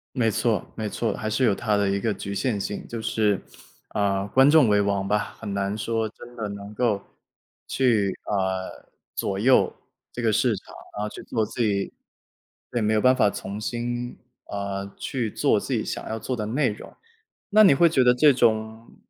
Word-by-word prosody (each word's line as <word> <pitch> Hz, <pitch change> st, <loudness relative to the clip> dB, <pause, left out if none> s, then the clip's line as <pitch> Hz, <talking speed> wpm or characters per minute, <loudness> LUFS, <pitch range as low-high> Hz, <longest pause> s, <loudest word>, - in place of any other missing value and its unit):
没 115 Hz, -4 st, +2 dB
错 110 Hz, 0 st, 0 dB
没 110 Hz, -2 st, -3 dB
错， 110 Hz, -1 st, -1 dB
还 110 Hz, -, -3 dB
是 120 Hz, -, 0 dB
有 105 Hz, -, +4 dB
它 105 Hz, 0 st, 0 dB
的 100 Hz, -1 st, +2 dB
一 100 Hz, 0 st, +1 dB
个 110 Hz, +1 st, 0 dB
局 100 Hz, 0 st, -5 dB
限 105 Hz, -1 st, -1 dB
性。 105 Hz, -, -4 dB
就 115 Hz, -, -5 dB
是， 105 Hz, -3 st, +1 dB, 0.5 s
呃， 100 Hz, -2 st, +1 dB
观 135 Hz, +5 st, +5 dB
众 150 Hz, -6 st, +6 dB
为 105 Hz, -1 st, +4 dB
王 100 Hz, -1 st, 0 dB
吧， 105 Hz, +1 st, -1 dB
很 100 Hz, -, -5 dB
难 100 Hz, +1 st, -1 dB
说 115 Hz, 0 st, -1 dB
真 120 Hz, +3 st, -12 dB
的 110 Hz, -2 st, -3 dB
能 100 Hz, +1 st, -8 dB
够 105 Hz, -5 st, +1 dB, 0.6 s
去， 110 Hz, -7 st, +2 dB
呃， 95 Hz, -2 st, -3 dB, 0.2 s
左 95 Hz, -1 st, -2 dB
右 125 Hz, +5 st, +4 dB, 0.4 s
这 -, -, -5 dB
个 115 Hz, -2 st, +2 dB
市 115 Hz, +2 st, +2 dB
场， 100 Hz, -, -10 dB, 0.2 s
然 105 Hz, -, -3 dB
后 105 Hz, -, -1 dB
去 -, -, -9 dB
做 110 Hz, -2 st, -1 dB
自 115 Hz, +2 st, -3 dB
己 100 Hz, -3 st, 0 dB, 0.8 s
对， 120 Hz, -, -1 dB
没 105 Hz, +1 st, +2 dB
有 110 Hz, -, +3 dB
办 130 Hz, +3 st, +5 dB
法 105 Hz, -5 st, +4 dB
从 100 Hz, +1 st, -6 dB
心， 120 Hz, +2 st, -4 dB, 0.3 s
呃， 100 Hz, 0 st, -4 dB
去 120 Hz, -5 st, -2 dB
做 -, -, +2 dB
自 -, -, -5 dB
己 -, -, +1 dB
想 -, -, -5 dB
要 110 Hz, -, -2 dB
做 125 Hz, +3 st, -3 dB
的 110 Hz, -, -3 dB
内 130 Hz, +6 st, +1 dB
容。 105 Hz, -, -8 dB, 0.5 s
那 215 Hz, +1 st, +6 dB
你 185 Hz, -9 st, +7 dB
会 170 Hz, +4 st, +5 dB
觉 135 Hz, -6 st, +3 dB
得 125 Hz, -, +6 dB
这 145 Hz, +2 st, +5 dB
种 110 Hz, -1 st, 0 dB
110 Hz, 215 characters per minute, -25 LUFS, 100-120 Hz, 0.8 s, 你